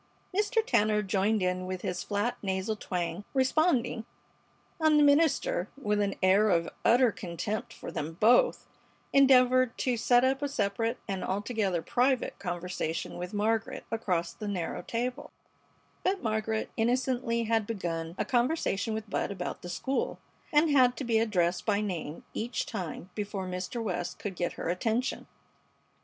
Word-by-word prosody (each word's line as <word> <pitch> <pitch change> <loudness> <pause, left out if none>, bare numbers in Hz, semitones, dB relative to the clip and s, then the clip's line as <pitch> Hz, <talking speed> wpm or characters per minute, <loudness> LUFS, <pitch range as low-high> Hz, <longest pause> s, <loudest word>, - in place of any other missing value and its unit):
Mr. 435 +3 +2
Tanner 215 - +2
joined 200 +2 +1
in 185 0 -1
with 185 -1 -4
his 180 - -2
flat, 205 +4 -1
nasal 190 +2 -1
twang, 180 -2 -3
responding, 260 -3 +2 0.8
and 315 -1 +4
the 295 - +6
minister, 285 - +3
with 210 -4 +1
an 200 -1 0
air 200 +3 +5
of 170 -3 +2
utter 245 0 +5
contempt 200 +4 -4
for - - -8
them 155 +2 -4
both, 240 - +4 0.5
endeavored 255 -2 +5
to 250 -2 +1
set 245 +2 +4
up 265 +1 +2
a 285 - -1
separate 225 0 -1
and 195 -3 -3
altogether 200 -3 -1
private 255 +1 +1
conversation 175 -3 -3
with 180 0 -5
Margaret 220 +2 -1
across 180 -7 -1
the 210 +5 -7
narrow 185 -5 -3
table; 250 +5 -3 0.7
but 380 -2 0
Margaret 220 0 -1
innocently 245 0 +1
had 225 -2 +1
begun 170 -6 -3
a - - -1
conversation 240 -4 0
with 220 0 -5
Bud 200 - -1
about 185 -3 -5
the 175 - -7
school, 265 +9 -2 0.3
and 300 +1 +4
had 255 -3 +5
to - - -3
be 230 -3 +2
addressed 180 -5 +1
by 205 -2 +1
name 175 -7 -4
each 240 +3 -2
time 185 -2 -6
before 205 -2 -4
Mr. 185 +6 -4
West 180 -4 -3
could 200 -3 -5
get 175 0 -2
her - - -5
attention. 225 +8 -1
215 Hz, 150 wpm, -29 LUFS, 185-250 Hz, 0.8 s, the